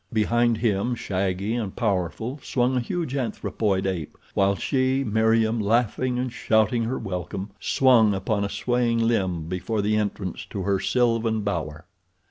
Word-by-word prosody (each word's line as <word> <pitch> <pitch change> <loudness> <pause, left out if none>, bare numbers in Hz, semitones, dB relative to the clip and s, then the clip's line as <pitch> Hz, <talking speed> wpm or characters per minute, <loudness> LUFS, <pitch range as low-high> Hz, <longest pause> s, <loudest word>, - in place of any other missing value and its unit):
Behind 120 +1 +2
him, 110 +1 0
shaggy 95 0 -2
and 110 -5 -3
powerful, 105 - -1
swung 125 0 0
a - - +2
huge 140 +3 -3
anthropoid 105 -5 -1
ape, 90 -6 -3 0.2
while 100 0 +2
she, 130 +3 +1
Meriem, 110 0 +2
laughing 120 +3 +1
and 125 -1 -2
shouting 115 +1 +2
her 125 +3 -2
welcome, 95 0 -5
swung 115 -6 +4
upon 100 +2 -1
a 100 - -1
swaying 120 +1 0
limb 95 -8 0
before 100 +4 -2
the 105 +1 +1
entrance 100 -3 -2
to 100 - -4
her 100 0 +1
sylvan 115 -2 +1
bower. 85 -5 -3
110 Hz, 145 wpm, -24 LUFS, 95-120 Hz, 0.2 s, swung